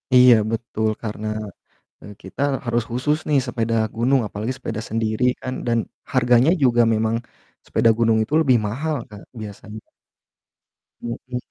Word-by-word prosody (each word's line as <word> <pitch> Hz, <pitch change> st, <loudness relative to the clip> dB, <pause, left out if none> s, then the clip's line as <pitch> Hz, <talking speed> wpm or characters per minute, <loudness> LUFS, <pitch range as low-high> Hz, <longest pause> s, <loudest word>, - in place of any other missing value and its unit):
Iya 125 Hz, -1 st, +8 dB, 0.2 s
betul 110 Hz, -1 st, -1 dB
karena, 110 Hz, 0 st, -4 dB, 0.7 s
eee, 105 Hz, -, -10 dB
kita 95 Hz, +8 st, -7 dB, 0.2 s
harus 120 Hz, 0 st, 0 dB
khusus 145 Hz, +6 st, 0 dB
nih 145 Hz, -2 st, +3 dB
sepeda 115 Hz, -1 st, -1 dB, 0.2 s
gunung 125 Hz, +3 st, +2 dB
apalagi 110 Hz, +6 st, -4 dB
sepeda 110 Hz, -, -5 dB
sendiri 110 Hz, +1 st, -1 dB, 0.2 s
kan, 130 Hz, -, -4 dB
dan, 115 Hz, 0 st, +2 dB, 0.4 s
harganya 125 Hz, +4 st, +4 dB
juga 120 Hz, -2 st, +4 dB
memang 110 Hz, +1 st, +1 dB, 0.5 s
sepeda 115 Hz, -, +2 dB
gunung 115 Hz, -1 st, +3 dB
itu 120 Hz, -, -8 dB
lebih 130 Hz, -5 st, +4 dB
mahal 150 Hz, +8 st, -2 dB
Kak 105 Hz, -1 st, -11 dB, 0.2 s
biasanya. 105 Hz, +1 st, -9 dB, 1.2 s
Hmm. 125 Hz, +2 st, -5 dB
115 Hz, 135 wpm, -22 LUFS, 110-125 Hz, 1.2 s, Iya